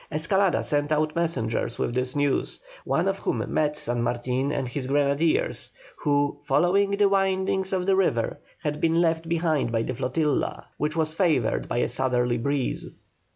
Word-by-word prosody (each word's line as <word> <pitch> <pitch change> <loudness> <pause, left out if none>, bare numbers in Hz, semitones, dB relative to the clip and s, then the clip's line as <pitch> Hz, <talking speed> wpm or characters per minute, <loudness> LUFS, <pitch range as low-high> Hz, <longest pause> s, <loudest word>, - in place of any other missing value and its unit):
Escalada 175 +4 +2
sent 145 0 0
out 155 0 +1
messengers 120 -9 0
with - - -1
this 125 +1 -1
news, 145 -1 0 0.3
one - - +1
of - - -1
whom - - -1
met 150 -1 +1
San 120 -5 -2
Martin 125 +3 -1
and 135 -3 -2
his 130 +1 -4
grenadiers, 145 +3 +1 0.3
who, 145 -1 0
following 180 +8 +2
the 200 0 +3
windings 190 -1 +1
of 185 -2 0
the 195 0 +3
river 145 -12 0 0.2
had 150 0 -2
been 165 0 +3
left 165 -1 +1
behind 160 -6 +1
by 115 -1 +1
the 130 - -3
flotilla, 145 +4 -1
which 150 +1 -1
was 155 -1 0
favoured 135 - +1
by - - -2
a - - +2
southerly 125 -2 0
breeze. 140 +1 -1
150 Hz, 165 wpm, -25 LUFS, 130-170 Hz, 0.3 s, the